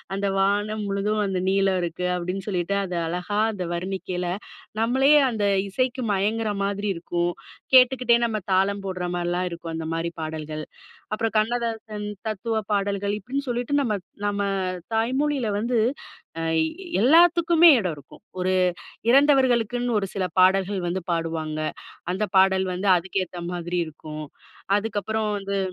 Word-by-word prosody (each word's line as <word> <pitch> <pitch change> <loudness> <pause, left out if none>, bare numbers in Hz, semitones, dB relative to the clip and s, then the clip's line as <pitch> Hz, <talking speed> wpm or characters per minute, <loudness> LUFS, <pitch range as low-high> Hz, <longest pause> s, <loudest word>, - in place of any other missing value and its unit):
அந்த 200 +1 -1
வானம் 205 +2 +1
முழுதும் 205 +2 0
வந்து 190 -2 -1
நீலம் 195 -1 +2
இருக்கு. 175 +1 -3
அப்டின்னு 180 +2 -4
சொல்லிட்டு 185 -1 -1
அது 180 -1 -5
அழகா 180 +5 -2
அந்த 185 -3 -4
வர்ணிக்கையில, 180 0 -3 0.5
நம்மளே 260 +5 +3 0.2
அந்த 215 -3 -1 0.2
இசைக்கு 255 +5 -1
மயங்குற 215 +3 0
மாதிரி 200 +1 -1
இருக்கும். 175 +1 -1 0.4
கேட்டுக்கிட்டே 250 -2 +6
நம்ம 220 -2 -1
தாளம் 195 +1 +1
போடுற 185 -1 -3
மாரிலாம் 175 +1 -1
இருக்கும். 170 -1 -6
அந்த 160 0 -4
மாதிரி 165 +1 -2
பாடல்கள். 155 -1 -5 0.5
அப்றம் 225 +1 -1
கண்ணதாசன் 220 -2 -2 0.2
தத்துவ 220 +2 -2
பாடல்கள் 200 0 0
இப்டின்னு 270 +7 -4
சொல்லிட்டு, 245 +3 -2
நம்ம 235 -6 0 0.3
நம்ம 205 0 -1 0.5
தாய்மொழில 260 +3 0
வந்து 235 +2 0 0.6
அ - - -2 0.6
எல்லாத்துக்கும் 335 +4 +5 0.2
எடம் 180 -6 -1
இருக்கும். 145 -2 -15 0.2
ஒரு 185 +1 +1 0.6
இறந்தவர்களுக்குனு 245 -3 +3
ஒரு 195 - -3
சில 190 -2 -1
பாடல்கள் 190 +1 +3
வந்து 185 +2 -2
பாடுவாங்க. 160 -2 -2 0.5
அந்த 190 +4 -1
பாடல் 190 0 +4
வந்து 185 +3 -2
அதுக்கு 185 +2 -1
ஏத்த 175 0 -9
மாதிரி 175 0 -3
இருக்கும். 155 -1 -8 0.5
அதுக்கப்பறம் 215 0 -2
வந்து 200 0 -3
200 Hz, 135 wpm, -24 LUFS, 180-225 Hz, 0.6 s, கேட்டுக்கிட்டே